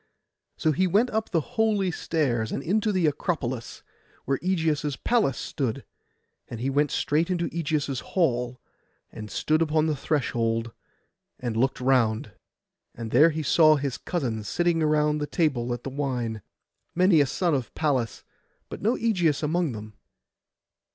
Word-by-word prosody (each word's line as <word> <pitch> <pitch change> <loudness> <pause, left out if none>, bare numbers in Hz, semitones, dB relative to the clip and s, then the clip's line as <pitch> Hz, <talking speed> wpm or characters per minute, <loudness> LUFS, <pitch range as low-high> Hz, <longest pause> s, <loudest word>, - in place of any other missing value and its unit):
So 155 - +2
he 185 +5 +2
went 215 +8 +2
up 220 0 -1
the 165 -4 -2
holy 205 -4 +2
stairs, 125 -10 -1
and 140 - -3
into 210 +6 +1
the 185 -4 +1
Acropolis, 140 -6 -2 0.4
where 135 0 0
Ægeus' 160 -6 0
palace 220 - +2
stood; 130 -6 -3 0.6
and 115 - -7
he 130 +3 -1
went 145 +1 +2
straight 160 +4 0
into 175 -2 0
Ægeus' 145 -5 -1
hall, 125 -8 0 0.5
and 105 -1 -8
stood 155 +8 +1
upon 155 -1 +2
the 155 -1 0
threshold, 115 -5 -1 0.7
and 120 -3 -3
looked 130 +4 +1
round. 120 -5 +1 0.6
And 115 -1 -6
there 160 +3 +6
he 155 0 -3
saw 155 +2 +5
his 140 -3 -3
cousins 115 - -3
sitting 175 -1 +1
about 150 -1 +2
the 150 - -2
table 135 -9 0
at 120 0 -4
the 135 - -5
wine: 125 -6 -2 0.5
many 180 -3 +5
a 140 - +2
son 170 +5 0
of 130 -5 -2
Pallas, 135 -8 -1 0.5
but - - -7
no 225 +5 +2
Ægeus 175 -10 +1
among 160 -2 0
them. 110 0 -8
150 Hz, 150 wpm, -26 LUFS, 125-170 Hz, 0.7 s, there